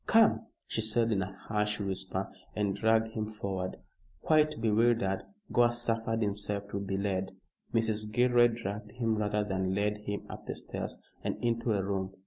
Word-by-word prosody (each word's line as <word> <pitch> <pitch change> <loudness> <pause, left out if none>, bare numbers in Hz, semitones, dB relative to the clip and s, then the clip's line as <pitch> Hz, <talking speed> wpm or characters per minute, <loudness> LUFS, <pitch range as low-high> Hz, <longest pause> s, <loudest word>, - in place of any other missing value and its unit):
"Come," 225 0 +5 0.2
she 110 - -1
said 115 +1 +3
in 100 -3 +2
a 95 +1 -3 0.2
harsh 105 0 0
whisper, 95 -1 -3 0.2
and 100 -2 0
dragged 110 +1 +3
him 110 -1 -3
forward. 95 -4 -3 0.5
Quite 155 -3 +3
bewildered, 110 -3 +3 0.3
Gore 120 0 +5
suffered 115 -1 0
himself 100 0 -2
to 100 - -2
be 95 -1 -2
led. 95 -1 -1 0.4
Mrs. 110 -2 +1
Gilroy 120 +1 +5
dragged 105 -3 -5
him 115 -2 0
rather 105 0 +1
than 95 -2 -1
led 105 +1 +1
him 105 -1 -4
up - - -9
the - - -3
stairs - - -4 0.3
and - - -1
into 115 -1 +1
a 100 -2 +1
room. 95 -1 -2
105 Hz, 165 wpm, -31 LUFS, 100-115 Hz, 0.5 s, Come